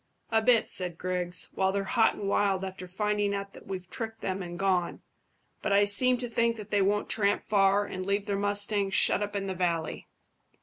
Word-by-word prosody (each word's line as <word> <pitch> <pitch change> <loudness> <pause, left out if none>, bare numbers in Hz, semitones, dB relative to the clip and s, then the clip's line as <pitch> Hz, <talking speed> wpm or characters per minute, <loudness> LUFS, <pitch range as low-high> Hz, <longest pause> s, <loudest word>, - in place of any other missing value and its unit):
"A 225 0 +3
bit," 230 0 +3
said 180 -3 0
Griggs, 180 0 0
"while 190 0 +1
they're 200 0 -1
hot 225 +3 +2
and 200 - -5
wild 195 -1 +1
after 185 -1 -8
finding 205 +2 -1
out 200 0 -6
that - - -14
we've 185 -2 -6
tricked 225 +2 -6
them 190 0 -3
and 175 -1 -7
gone; 185 -3 -1 0.6
but - - -2
I 200 +1 +5
seem 250 +5 +4
to 245 0 -3
think 235 0 0
that 210 -2 -10
they 205 -1 +2
won't 205 +2 +1
tramp 205 -2 +1
far 200 0 +3
and 185 -2 -6
leave 200 +1 -1
their 200 -1 -2
mustangs 205 0 0
shut - - +5
up 205 0 -4
in 200 -1 -2
the 190 - -3
valley. 170 -3 -2
200 Hz, 210 wpm, -28 LUFS, 190-210 Hz, 0.6 s, I